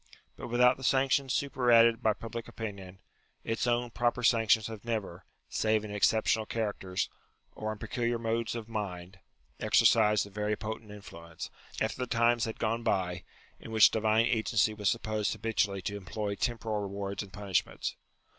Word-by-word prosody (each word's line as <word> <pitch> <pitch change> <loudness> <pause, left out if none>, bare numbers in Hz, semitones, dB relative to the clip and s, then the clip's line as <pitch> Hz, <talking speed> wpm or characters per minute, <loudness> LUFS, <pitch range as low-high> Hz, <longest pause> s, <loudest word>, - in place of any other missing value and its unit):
But - - -7
without 125 +1 +4
the 135 - -11
sanctions 135 +1 +2
superadded 120 -5 +4
by 110 - +3
public 115 +2 -7
opinion, 100 -4 -7 0.5
its 115 +2 -1
own 120 0 0
proper 120 +1 0
sanctions 110 -2 +4
have 110 -2 -7
never, 110 -7 -4 0.2
save 110 -1 +1
in 105 - -7
exceptional 110 +1 +2
cha 110 -2 -1
racters, 95 0 -3 0.5
or 110 0 -4
in 110 - -6
peculiar 120 +2 -2
moods 115 0 -2
of 115 -2 -6
mind, 95 -4 -5 0.4
exercised 105 -2 +4
a 100 - -13
very 105 +1 -1
potent 110 0 -6
influence, 85 -5 -9 0.3
after - - -1
the 125 - -2
times 120 0 +2
had 115 - -5
gone 115 +1 -1
by, 90 -5 -1 0.4
in - - -10
which 110 -1 +6
divine 110 +1 +2
agency 110 -2 +2
was 105 -2 0
supposed 110 -2 -1
habitually 100 -4 -1
to 100 +2 -3
employ 100 +2 -4
temporal 110 -1 -2
rewards 100 0 -4
and 100 -2 -9
punishments. 100 -2 -2
110 Hz, 160 wpm, -30 LUFS, 100-115 Hz, 0.5 s, which